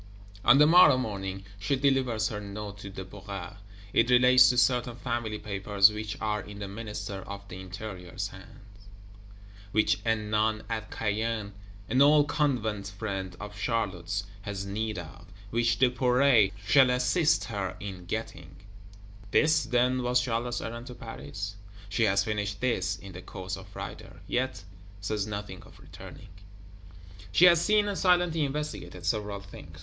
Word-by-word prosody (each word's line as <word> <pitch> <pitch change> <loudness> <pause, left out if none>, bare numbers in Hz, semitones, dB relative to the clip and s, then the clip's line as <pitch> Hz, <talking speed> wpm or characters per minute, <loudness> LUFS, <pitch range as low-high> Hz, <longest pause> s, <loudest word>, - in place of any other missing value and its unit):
On 120 +3 +7
the 150 - +7
morrow 170 -4 +7
morning, 95 -5 -4
she 105 +8 0
delivers 130 -5 +1
her 105 - -4
Note 100 0 -7
to 100 - -8
Duperret. 95 -1 -8 0.4
It 115 +2 +3
relates 125 0 +7
to 125 - +1
certain 125 -1 +2
Family 120 -3 -3
Papers 100 0 +3
which 105 0 -5
are 105 -1 -1
in 105 -1 -10
the 100 -1 -5
Minister 105 -1 -6
of 100 0 -8
the 90 - -8
Interior's 95 0 -6
hands; 100 +1 -15 0.8
which 110 0 +2
a 115 0 +2
Nun 110 0 0
at 110 -1 -4
Caen, 110 -1 -2 0.3
an 130 - +2
old 145 +1 +6
Convent 110 -10 0
friend 100 -3 -5
of 105 0 -8
Charlotte's, 100 -3 -2 0.2
has 100 -1 -5
need 110 +2 -3
of; 85 -3 -9 0.2
which 115 -1 +2
Duperret 125 -3 +4
shall 130 +4 +6
assist 125 +6 +2
her 95 -4 -4
in 95 -3 -7
getting: 90 -5 -5 0.7
this 155 +4 +3
then 125 +2 +2
was 125 0 +2
Charlotte's 120 0 -2
errand 120 +2 -6
to 125 - -8
Paris? 100 - -7 0.3
She 110 +3 +2
has 100 -2 +3
finished 105 -1 -3
this, 105 -8 0
in 95 +3 -11
the 90 +1 -9
course 95 0 -6
of 95 0 -11
Friday: 95 - -8 0.2
yet 130 -4 -2 0.4
says 100 0 -2
nothing 100 -3 -6
of - - -17
returning. - - -12 1.0
She 180 - +6
has 170 -2 +7
seen 210 -1 +3
and 200 - -2
silently 175 -4 +2
investigated 145 - -4
several 105 +1 -1
things. 80 -4 -12
105 Hz, 150 wpm, -28 LUFS, 100-125 Hz, 1.0 s, On